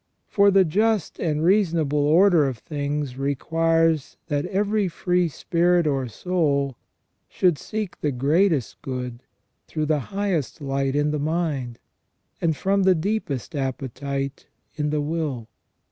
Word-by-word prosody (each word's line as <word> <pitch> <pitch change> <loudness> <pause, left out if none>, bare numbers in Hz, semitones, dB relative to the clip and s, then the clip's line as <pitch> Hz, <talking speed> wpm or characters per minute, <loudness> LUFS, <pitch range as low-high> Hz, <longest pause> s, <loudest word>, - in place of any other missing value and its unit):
For 200 -1 +4
the 195 -1 +5
just 210 +4 0
and 155 -2 0
reasonable 165 -6 +2
order 165 -1 +5
of 130 -3 -3
things 145 -1 -4
requires 165 +2 +1
that 145 -1 0
every 205 +1 +1
free 180 0 0
spirit 175 +3 +1
or 135 -4 0
soul 140 - 0 0.5
should 175 -5 +2
seek 215 -4 -5
the 150 - +1
greatest 145 - +1
good 125 -2 -5 0.5
through 155 -1 -2
the 150 -1 +1
highest 195 -9 -2
light 135 -1 -1
in 145 +1 +2
the 150 - -1
mind, 145 -6 -2 0.6
and 160 -3 +1
from 195 +1 +1
the 190 -1 +4
deepest 165 - -2
appetite 135 +1 -4 0.3
in 150 -1 -1
the 150 0 0
will. 145 -7 -3
155 Hz, 130 wpm, -24 LUFS, 140-180 Hz, 0.6 s, the